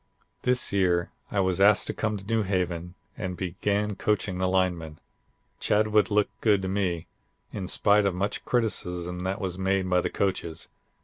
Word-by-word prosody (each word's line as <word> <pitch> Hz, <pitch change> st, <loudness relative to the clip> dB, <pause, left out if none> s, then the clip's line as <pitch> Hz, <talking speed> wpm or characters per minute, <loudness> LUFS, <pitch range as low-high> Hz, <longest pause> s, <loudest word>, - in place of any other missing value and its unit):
This 125 Hz, -3 st, +2 dB
year 90 Hz, -3 st, +2 dB, 0.2 s
I 100 Hz, -, +1 dB
was 95 Hz, 0 st, 0 dB
asked 100 Hz, +1 st, +6 dB
to -, -, -3 dB
come 110 Hz, -1 st, -1 dB
to 100 Hz, -, -10 dB
New 115 Hz, +1 st, +1 dB
Haven 90 Hz, -3 st, -2 dB, 0.2 s
and 90 Hz, -2 st, -4 dB
began 100 Hz, +3 st, -1 dB
coaching 95 Hz, -2 st, -1 dB
the 95 Hz, -, +1 dB
linemen. 90 Hz, -4 st, 0 dB, 0.6 s
Chadwick 105 Hz, 0 st, +2 dB
looked 105 Hz, -1 st, 0 dB
good 105 Hz, -4 st, +3 dB
to -, -, -1 dB
me, 95 Hz, -4 st, -1 dB, 0.5 s
in 95 Hz, -3 st, -4 dB
spite 105 Hz, +2 st, +3 dB
of 95 Hz, -, -1 dB
much 100 Hz, +3 st, -2 dB
criticism 90 Hz, -7 st, -1 dB
that 95 Hz, +2 st, -2 dB
was 95 Hz, -2 st, -3 dB
made 95 Hz, 0 st, +1 dB
by 90 Hz, -1 st, +3 dB
the -, -, -1 dB
coaches. 85 Hz, -4 st, -2 dB
95 Hz, 170 wpm, -27 LUFS, 90-105 Hz, 0.6 s, asked